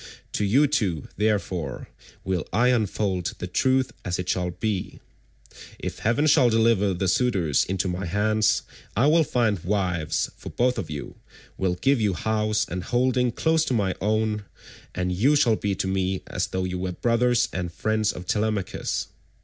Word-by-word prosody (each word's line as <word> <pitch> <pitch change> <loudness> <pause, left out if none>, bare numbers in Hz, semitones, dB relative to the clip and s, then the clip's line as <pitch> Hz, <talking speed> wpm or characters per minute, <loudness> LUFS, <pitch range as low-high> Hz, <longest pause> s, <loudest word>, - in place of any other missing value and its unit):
To - - 0
you 125 +9 +4
two, 100 - -1
therefore, 95 - -1 0.4
will 95 -4 -2
I 120 +3 +3
unfold 100 -6 0
the - - -5
truth 130 +8 +1
as 90 -1 -2
it 90 - -4
shall 90 -1 0
be. 95 +2 -3 0.8
If - - -5
heaven 120 +7 +1
shall 130 -5 +5
deliver 110 -4 +3
the 95 +2 -1
suitors 95 - +2
into 95 0 -1
my 90 0 -3
hands, 105 +4 +2 0.3
I 120 - +4
will 160 +2 +5
find 115 - +1
wives 90 -5 -1
for - - -9
both 125 +1 +1
of 80 - -5
you, 75 -2 -6 0.4
will 95 -2 0
give 135 +7 +2
you 100 -4 +1
house 110 +3 0
and 90 +1 -4
holding 125 0 +1
close 160 +5 +2
to 130 - 0
my 100 -4 +1
own, 105 0 0 0.5
and 90 0 -1
you 120 +12 +3
shall 120 -6 +4
be 100 -2 -2
to - - -2
me 95 0 -1
as 90 - -2
though 95 0 -2
you 90 0 -3
were 90 0 -3
brothers 120 +4 +2
and 90 -2 -3
friends 110 +3 0
of 90 - -8
Telemachus. 105 -1 -1
105 Hz, 170 wpm, -25 LUFS, 90-115 Hz, 0.8 s, shall